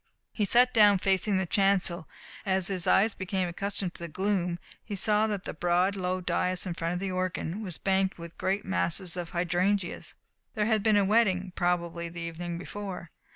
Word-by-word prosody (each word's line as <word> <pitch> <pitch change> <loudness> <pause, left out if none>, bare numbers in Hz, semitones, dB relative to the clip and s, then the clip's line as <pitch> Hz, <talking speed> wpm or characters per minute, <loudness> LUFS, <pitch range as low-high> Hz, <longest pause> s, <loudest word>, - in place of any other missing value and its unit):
He 210 - 0
sat 245 +5 +4
down 210 -3 +6
facing 195 +1 +1
the 190 - 0
chancel, 190 -3 +1 0.3
and 190 -1 +1
as 190 0 0
his 185 -1 -1
eyes 205 +4 +4
became 190 -1 -2
accustomed 195 +1 -3
to - - -13
the 170 - -4
gloom 180 0 -1 0.3
he 205 - -5
saw 210 +2 +2
that 205 -3 -3
the - - -5
broad, 175 +4 +1
low 185 -1 -2
dais 180 0 0
in 180 - -3
front 170 +1 -2
of - - -2
the 195 0 -3
organ 185 +1 -2
was 185 -6 -4
banked 190 -1 0
with 170 -1 -9
great 195 +2 -1
masses 185 -1 0
of 175 -2 -4
hydrangeas. 180 +2 -1 0.4
There 210 - +1
had 220 -1 +2
been 215 0 +3
a 200 - +4
wedding, 190 -4 +2
probably 170 -1 -1
the 170 0 -8
evening 170 +1 -5
before. 185 -2 -7
185 Hz, 195 wpm, -28 LUFS, 175-200 Hz, 0.4 s, down